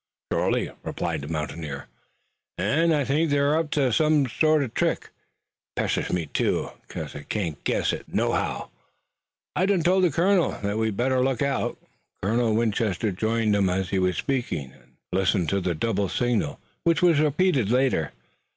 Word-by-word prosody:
"Shorely," - - 0
replied - - -3
the 70 - -7
mountaineer, 75 -2 -4 0.7
"an' 165 +4 +2
I 145 -3 +2
think 155 +5 +1
they're 145 +1 +3
up 160 -1 0
to 130 -5 +2
some 155 0 +3
sort 155 +4 +3
uv 120 - -6
trick. - - -1
It - - -16
pesters - - 0
me 90 -2 0
too, - - -1 0.2
'cause - - -6
I 75 - -6
can't 80 -3 -4
guess - - +1
it - - -7
nohow. - - -1 0.8
I 185 - +2
done 195 -4 +2
told 185 +2 +3
the 180 - +5
colonel 175 +4 +2
that 100 +2 -1
we'd 110 -3 -1
better 130 +1 +2
look 130 -2 0
out." 140 -1 -1 0.5
Colonel 115 +2 +2
Winchester 110 -2 0
joined 110 +2 +1
them 100 -2 +3
as 95 0 -1
he 95 - +1
was 90 -2 +1
speaking, 115 - -2
and - - -23 0.2
listened 95 -2 +1
to 100 0 0
the 90 -2 -1
double 100 +2 0
signal 120 - 0 0.2
which 170 +1 +2
was 170 -4 +5
repeated 150 - +2
later. 125 - +2
115 Hz, 170 wpm, -25 LUFS, 95-150 Hz, 0.8 s, the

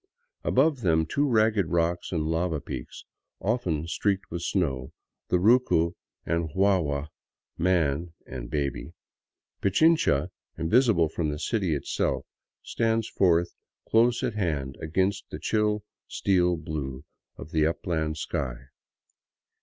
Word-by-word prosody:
Above 140 0 +2
them 80 -5 +3
two 145 - 0
ragged 110 -5 +3
rock 85 0 +1
and 80 -4 0
lava 80 0 0
peaks, 65 -3 -8 0.3
often 90 -8 -1
streaked 100 +3 -1
with 85 0 -3
snow, 70 -10 -1 0.4
the 90 - +2
Rucu 95 -5 +3 0.3
and 85 0 0
Guagua 80 -5 +1 0.5
("Man" 85 -2 +1
and 60 -2 -7
"Baby") 70 -2 -3 0.7
Pichincha, 100 - +3 0.3
invisible 85 0 +3
from 80 0 -2
the 75 - -3
city 95 -2 0
itself, 70 - -1 0.4
stand 115 -1 0
forth 85 -4 +2 0.3
close 120 +1 +3
at - - 0
hand 75 -10 -2
against 95 +4 -1
the - - -6
chill 105 -1 0 0.2
steel 90 -3 +2
blue 75 -3 -5 0.3
of 80 - -10
the 80 -1 +3
upland 80 -2 -2
sky. 65 -3 -3
85 Hz, 120 wpm, -27 LUFS, 75-100 Hz, 0.7 s, them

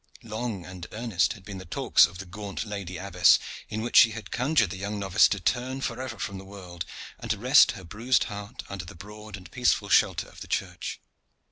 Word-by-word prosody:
Long 110 -4 -4
and 90 -1 -8
earnest 105 -7 +1
had 100 -5 -15
been 100 -2 -7
the - - -8
talks 85 - +4
of 85 +1 -12
the 95 - -7
gaunt 100 +3 -6
lady 100 -4 -5
abbess, 90 -2 +5 0.3
in 110 0 -3
which 120 - -4
she 115 - +8
had 115 -1 -8
conjured 125 - +2
the 95 - -5
young 100 +2 -4
novice 100 0 +4
to 100 - -2
turn 125 +8 -1
forever 130 -4 -4
from 100 -1 -4
the - - -10
world, 95 -3 -8 0.3
and - - -7
to - - +1
rest - - +6
her 95 - -10
bruised 115 +9 +1
heart 105 +2 -7
under 100 -2 -6
the 85 - -11
broad 105 +3 -10
and 90 - -14
peaceful 120 -5 +1
shelter 95 -5 +3
of - - -15
the - - -7
church. - - -3
100 Hz, 215 wpm, -27 LUFS, 95-110 Hz, 0.3 s, she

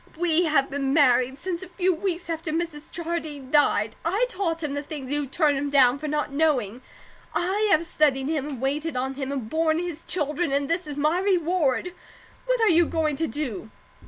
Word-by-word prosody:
"We 345 0 +2
have 300 -4 +2
been 275 0 -1
married 260 -3 +4
since 345 +3 -4
a 375 - -9
few 365 0 +1
weeks 350 0 -3
after 325 -1 -3
Mrs. 320 -2 -4
Jardine 315 -5 -5
died. 225 -7 +3
I 395 +9 +1
taught 335 -7 -2
him 290 -2 -2
the 285 - -2
things 285 -3 -7
you 290 -1 -1
turned 295 +1 +2
him 285 +1 -2
down 270 -2 +4
for 305 - -4
not 295 -1 -1
knowing; 260 -7 0 0.5
I 395 +5 +1
have 335 -3 +3
studied 275 -5 +1
him, 300 -2 -1
and 275 -5 -6
waited 290 +1 -1
on 265 +2 -1
him, 270 0 -4
and 265 -6 -3
borne 315 +4 +1
his 340 -2 -4
children, 300 -1 -1
and 280 0 0
THIS 335 +1 -1
is 290 -1 -6
my 305 +4 +2
reward. 355 -4 +1 0.5
What - - +2
are 445 - +5
you 340 -1 +4
going 310 -3 0
to 325 - 0
do?" 250 -10 -4
305 Hz, 200 wpm, -25 LUFS, 275-340 Hz, 0.5 s, are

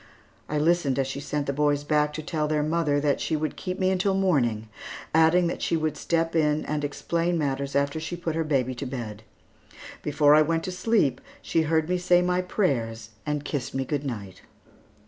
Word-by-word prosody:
I 150 - -1
listened 155 -3 +2
as 135 - +2
she 135 +1 -5
sent 145 0 -2
the 140 - -1
boys 145 0 +1
back 150 0 +2
to 155 - -5
tell 155 0 -1
their 150 -1 +1
mother 155 -2 +1
that 145 -1 +1
she 160 - 0
would 155 0 -2
keep 185 -1 -4
me 185 0 +2
until 190 +1 +1
morning, 125 - +1 0.5
adding 160 +3 +5
that 170 - -2
she 165 - +1
would 155 -1 -1
step 165 +2 -1
in 150 -1 +2
and 150 -1 -2
explain 170 +4 -1
matters 140 -2 -2
after 140 +2 +1
she 160 +2 -4
put 170 -2 -3
her 165 +1 0
baby 135 -4 0
to 130 +2 -5
bed. 115 -5 -6 0.8
Before 150 0 +4
I 155 - +7
went 165 +1 +1
to 185 - -3
sleep 180 - +1 0.2
she 165 - +1
heard 160 0 +1
me 180 0 0
say 180 0 +4
my 180 0 +1
prayers 120 - -1 0.2
and 150 -1 -2
kissed 135 -3 -3
me 135 0 -1
good 145 +1 -2
night. 105 -9 -6
150 Hz, 205 wpm, -26 LUFS, 140-170 Hz, 0.8 s, I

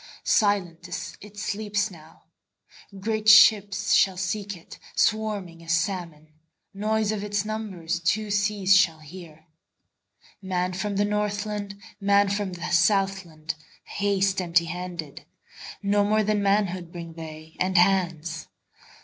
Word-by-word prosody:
Silent 185 -5 +1 0.3
it 210 0 -13
sleeps 205 0 -2
now; 160 -2 -16 0.8
Great 215 +1 0
ships 205 -2 +6
shall 190 -2 +4
seek 195 +1 -3
it, 165 - -14 0.2
Swarming 205 -6 0
as 165 0 -1
salmon; 165 -3 -2 0.4
Noise 215 +1 0
of 210 -2 -3
its 205 -1 -1
numbersTwo 205 -2 -2
seas 205 -1 +3
shall 185 -4 +4
hear. 160 0 -12 1.0
Man 185 -1 -1
from 200 +2 -3
the 205 +1 +2
Northland, 205 -1 -2 0.2
Man 200 0 +3
from 200 -2 -2
the 175 0 -5
Southland, 175 -3 +1 0.3
Haste 195 -1 0
empty 170 -1 +2
handed; 175 -3 -6 0.6
No 205 +1 +3
more 215 +1 +2
than 210 0 +1
manhoodBring 180 -4 -1
they, 160 -1 -10
and 185 +1 +1
hands. 175 -3 +1
195 Hz, 115 wpm, -25 LUFS, 170-205 Hz, 1.0 s, ships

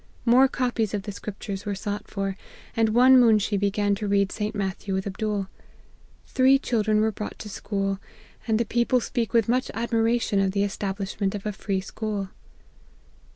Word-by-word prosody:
More 255 +3 +6
copies 245 -5 -1
of 200 - -3
the 205 - -5
scriptures 200 -1 -6
were 205 -1 -3
sought 205 +1 -4
for; 195 -1 -3 0.4
and 225 -1 +3
one 255 +3 +7
moonshee 215 -3 +4
began 205 +1 +1
to 205 +1 -3
read 200 -1 +2
St. 210 0 -3
Matthew 195 -1 -3
with 190 - -2
Abdool. 200 0 -2 0.8
Three 265 +1 +4
children 215 -5 +1
were 220 0 +2
brought 210 0 -6
to 210 - -8
school, 195 -1 -2 0.5
and 220 -1 +2
the 235 - +1
people 240 +3 +2
speak 230 -3 -2
with 230 -3 +3
much 255 +2 +1
admiration 230 -2 +1
of 195 -1 +1
the 200 0 +1
establishment 200 0 -2
of 200 - -6
a 210 - -1
free 195 -1 -2
school. 205 -1 -4
210 Hz, 170 wpm, -25 LUFS, 200-230 Hz, 0.8 s, one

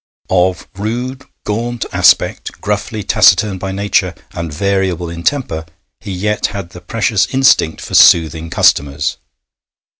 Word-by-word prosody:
Of 90 0 +1
rude, 125 +6 -4 0.2
gaunt 115 +3 -3
aspect, - - +2
gruffly 105 +1 -3
taciturn 100 0 +3
by 95 +1 -4
nature, 100 +1 0 0.2
and 85 -2 -5
variable 95 0 -1
in 85 0 -7
temper, 105 - -1 0.4
he 100 - -8
yet 105 +3 -1
had 95 -4 -7
the 90 - -11
precious 110 -2 0
instinct 130 -11 +3
for - - -9
soothing 80 0 +5
customers. 70 -2 +1
95 Hz, 125 wpm, -15 LUFS, 85-110 Hz, 0.4 s, soothing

